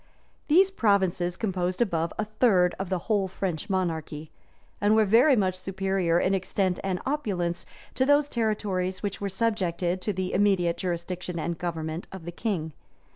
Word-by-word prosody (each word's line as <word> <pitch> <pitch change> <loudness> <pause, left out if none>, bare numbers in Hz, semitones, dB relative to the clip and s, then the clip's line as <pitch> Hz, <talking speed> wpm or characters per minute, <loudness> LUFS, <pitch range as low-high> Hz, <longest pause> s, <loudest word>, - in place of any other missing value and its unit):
These 370 +5 +5
provinces 190 - +1
composed 185 -4 -2
above 170 -8 0
a 215 - -1
third 205 -5 +3
of 190 -2 -3
the 190 - 0
whole 205 -4 +1
French 185 -1 -4
monarchy, 160 -5 -2 0.5
and 205 +1 +4
were 220 -1 +5 0.3
much 190 -3 +2
superior, 190 -2 0
in 185 - +1
extent 190 -1 0
and 190 -2 -1
opulence, 185 - -2 0.3
to 260 - +1
those 290 0 +4
territories 205 -6 -1
which 200 -1 -3
were 200 - -1
subjected 185 -4 -1
to 210 - -1
the 185 -1 -3
immediate 185 -4 +2
jurisdiction 180 0 -4
and 170 +1 -2
government 165 -1 -4
of 190 -4 -9
the 175 - -5
king. 170 -5 -3
185 Hz, 155 wpm, -27 LUFS, 175-205 Hz, 0.5 s, These